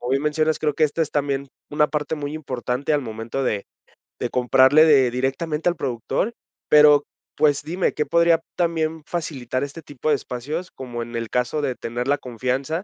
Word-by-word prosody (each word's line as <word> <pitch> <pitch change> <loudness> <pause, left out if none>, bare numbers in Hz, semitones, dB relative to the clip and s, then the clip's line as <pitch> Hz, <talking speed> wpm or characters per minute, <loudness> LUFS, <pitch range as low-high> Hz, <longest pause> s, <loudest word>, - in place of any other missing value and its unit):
como 120 - -4
bien 135 +1 +1
mencionas, 155 +1 +1
creo 150 -2 0
que 155 - +3
esta 155 +2 -2
es 155 - -3
también 140 -1 -1 0.2
una 150 0 +3
parte 150 +1 -2
muy 145 -1 -4
importante 135 -1 -3
al 145 -1 +2
momento 115 +3 -4
de 105 -5 -1 0.5
de - - -2
comprarle 130 +4 +5
de 135 -6 +5
directamente 150 +6 -1
al 175 - -2
productor, 135 - -2 0.4
pero, 150 -1 +7 0.3
pues, 145 -1 +3
dime, 175 +4 -1
¿qué 150 - -1
podría 170 +1 +4
también 160 -2 -1
facilitar 135 -7 -3
este 145 +3 -7
tipo 145 +1 -4
de 150 - +5
espacios?, 145 +7 -5
como 120 -3 -6
en 120 0 -9
el 115 -1 -3
caso 125 +5 0
de 135 -3 -1
tener 120 +2 -4
la 145 +1 +3
confianza 130 - -3
145 Hz, 185 wpm, -22 LUFS, 125-155 Hz, 0.5 s, pero